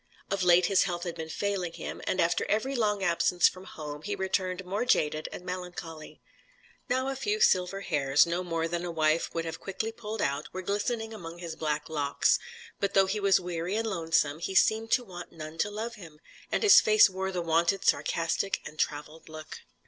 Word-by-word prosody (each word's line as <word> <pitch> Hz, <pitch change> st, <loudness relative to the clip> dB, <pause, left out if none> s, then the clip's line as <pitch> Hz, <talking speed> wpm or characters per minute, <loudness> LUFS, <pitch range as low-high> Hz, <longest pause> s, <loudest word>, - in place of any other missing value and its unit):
Of 195 Hz, -1 st, 0 dB
late 180 Hz, 0 st, +5 dB
his 195 Hz, +1 st, +3 dB
health 175 Hz, -2 st, -3 dB
had 175 Hz, -2 st, -3 dB
been 160 Hz, -1 st, -7 dB
failing 190 Hz, -1 st, -2 dB
him, -, -, -7 dB
and 185 Hz, -, 0 dB
after 170 Hz, -, +2 dB
every 260 Hz, +6 st, 0 dB
long 210 Hz, -4 st, +1 dB
absence 175 Hz, 0 st, +3 dB
from 185 Hz, 0 st, -6 dB
home, 150 Hz, -3 st, -8 dB
he 205 Hz, +4 st, -3 dB
returned 190 Hz, -1 st, -2 dB
more 200 Hz, +5 st, -1 dB
jaded 155 Hz, -10 st, +1 dB
and 180 Hz, -, -8 dB
melancholy. 180 Hz, -3 st, -7 dB, 0.7 s
Now 260 Hz, +2 st, +1 dB
a 270 Hz, -, -3 dB
few 415 Hz, +10 st, -1 dB
silver 190 Hz, -, +3 dB
hairs 145 Hz, -6 st, +3 dB
no 170 Hz, +2 st, -2 dB
more 165 Hz, -2 st, -1 dB
than 170 Hz, +1 st, -3 dB
a 175 Hz, -, -3 dB
wife 160 Hz, -1 st, +1 dB
would 165 Hz, 0 st, -1 dB
have 165 Hz, 0 st, -5 dB
quickly 220 Hz, +3 st, -4 dB
pulled 220 Hz, -1 st, -6 dB
out 140 Hz, -3 st, -2 dB
were 185 Hz, 0 st, -5 dB
glistening 220 Hz, +3 st, -2 dB
among 170 Hz, -5 st, -8 dB
his 170 Hz, -2 st, -6 dB
black 155 Hz, -2 st, -2 dB
locks; 145 Hz, -3 st, +1 dB, 0.4 s
but 200 Hz, -1 st, -1 dB
though 195 Hz, 0 st, +6 dB
he 195 Hz, +3 st, -2 dB
was 195 Hz, -2 st, +4 dB
weary 175 Hz, +1 st, -3 dB
and 225 Hz, +1 st, -1 dB
lonesome, 160 Hz, -6 st, 0 dB
he 190 Hz, +3 st, -4 dB
seemed 220 Hz, +3 st, +3 dB
to 250 Hz, -, +3 dB
want 180 Hz, -5 st, -9 dB
none 155 Hz, 0 st, -9 dB
to 205 Hz, -, +1 dB
love 220 Hz, +3 st, -5 dB
him, 155 Hz, -3 st, -12 dB, 0.3 s
and -, -, 0 dB
his 415 Hz, -, +9 dB
face 215 Hz, -1 st, +6 dB
wore 190 Hz, 0 st, -3 dB
the 180 Hz, -2 st, -2 dB
wonted 170 Hz, +4 st, +1 dB
sarcastic 165 Hz, +4 st, +1 dB
and 155 Hz, -, -10 dB
travelled 150 Hz, +2 st, -3 dB
look. 155 Hz, 0 st, -9 dB
180 Hz, 200 wpm, -29 LUFS, 165-200 Hz, 0.7 s, his